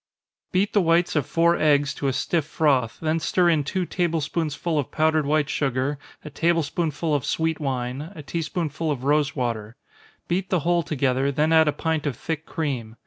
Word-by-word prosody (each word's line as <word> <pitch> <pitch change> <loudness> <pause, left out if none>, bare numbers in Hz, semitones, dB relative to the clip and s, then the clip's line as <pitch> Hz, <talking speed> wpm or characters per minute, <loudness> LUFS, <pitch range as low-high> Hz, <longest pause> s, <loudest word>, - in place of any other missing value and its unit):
_ - - -52
Beat 195 +3 +1
the 205 - +4
whites 170 0 +2
of 145 -5 +1
four 170 +1 +3
eggs 145 -2 +3
to 140 - -3
a 135 - +1
stiff 160 +3 0
froth 135 -7 +1
then 160 0 0
stir 175 +2 +2
in 155 -3 +2
two 180 +6 -2
table 170 -2 0
spoonsful 155 +1 -2
of 140 - -3
powdered 155 -1 +1
white 150 0 +2
sugar, 135 0 -1 0.3
a 150 - -7
table 165 +2 +1
spoonful 155 0 -2
of 145 -3 +1
sweet 160 -1 -1
wine, 135 +2 -3
a 155 - -8
tea 165 +4 -3
spoonful 160 -1 -3
of 135 -4 -2
rosewater. 125 -7 0 0.5
Beat 185 +2 -1
the 180 -4 +1
whole 175 +2 +2
together, 140 -3 0
then 150 +3 +1
add 160 -1 +6
a - - +4
pint 160 -1 -2
of 130 -5 -3
thick 160 -1 -4
cream. 125 -8 -3
155 Hz, 200 wpm, -24 LUFS, 140-165 Hz, 0.5 s, add